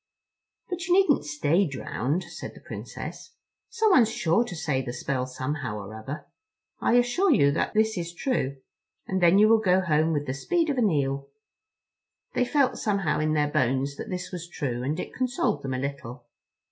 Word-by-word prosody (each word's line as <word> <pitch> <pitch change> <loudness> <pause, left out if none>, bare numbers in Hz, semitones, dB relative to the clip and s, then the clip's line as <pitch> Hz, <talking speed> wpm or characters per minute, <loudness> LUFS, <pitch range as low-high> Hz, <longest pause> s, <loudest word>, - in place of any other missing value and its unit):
"But 355 -2 -4
you 355 - +4
needn't 335 - +4
stay 150 +5 +1
drowned," 140 +3 -2
said 175 - -8
the - - -12
Princess. - - -8 0.3
"Someone's 420 - +4
sure 170 +3 +2
to 215 -7 -7
say 150 -5 -1
the 120 -2 -5
spell 130 0 -2
somehow 130 -3 -4
or 100 +1 -8
other. 120 +8 -7 0.5
I - - +2
assure 245 +11 +3
you 140 - +5
that 155 - -1
this 220 -2 +2
is 170 0 -4
true; 175 - -1 0.5
and 190 -1 -1
then 175 +2 +6
you 210 +1 +7
will 225 0 +5
go 185 -3 +3
home 160 -3 +2
with 145 -2 -1
the 130 - -2
speed 325 - 0
of 265 - -1
an 220 -4 +4
eel." 140 -3 -1 1.0
They 250 - +2
felt, 275 -1 +1
somehow, 200 -6 0
in 155 0 +1
their 150 -1 +1
bones 135 +2 +1
that - - -6
this 180 -1 -4
was 175 -2 -6
true, 125 -8 -3
and 145 +6 -2
it - - -5
consoled 255 - 0
them 135 -2 -3
a - - -1
little. 130 -2 -5
165 Hz, 185 wpm, -26 LUFS, 140-220 Hz, 1.0 s, you